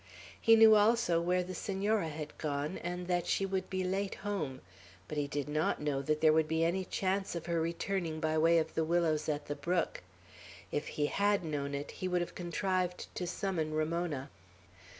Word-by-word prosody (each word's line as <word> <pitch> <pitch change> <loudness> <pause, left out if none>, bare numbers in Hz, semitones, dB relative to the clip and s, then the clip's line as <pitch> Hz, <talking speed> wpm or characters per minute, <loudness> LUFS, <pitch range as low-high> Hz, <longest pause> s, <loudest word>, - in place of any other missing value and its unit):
He 225 -1 +7
knew 225 -1 +8
also 210 -5 +4
where 180 +1 +1
the 185 +1 -6
Senora 195 0 0
had 150 0 -6
gone, 150 +2 -2
and 180 +1 -4
that 175 -1 0
she 195 - +1
would 190 -1 -2
be 185 -1 -1
late 195 +2 -1
home; 170 -11 -3 0.5
but - - -5
he 145 -1 0
did 145 0 -3
not 155 +2 0
know 145 -2 -1
that 155 +2 -1
there 155 -1 +6
would 160 0 +3
be 160 +1 +1
any 185 +3 0
chance 190 0 -1
of 170 - -4
her 170 -1 0
returning 170 0 -2
by 155 0 0
way 165 +1 +5
of 160 -1 0
the 160 - +1
willows 160 -2 +1
at 145 -1 -2
the 145 - -3
brook; 170 +5 -1 0.7
if 145 - -2
he 145 - -1
had 200 +2 +1
known 140 -2 -2
it, 140 +1 -5
he 185 - -4
would 180 -1 +1
have 175 - -4
contrived 180 +1 -2
to 180 - -3
summon 170 -5 -2
Ramona. 155 -3 -1
170 Hz, 195 wpm, -32 LUFS, 155-185 Hz, 0.7 s, knew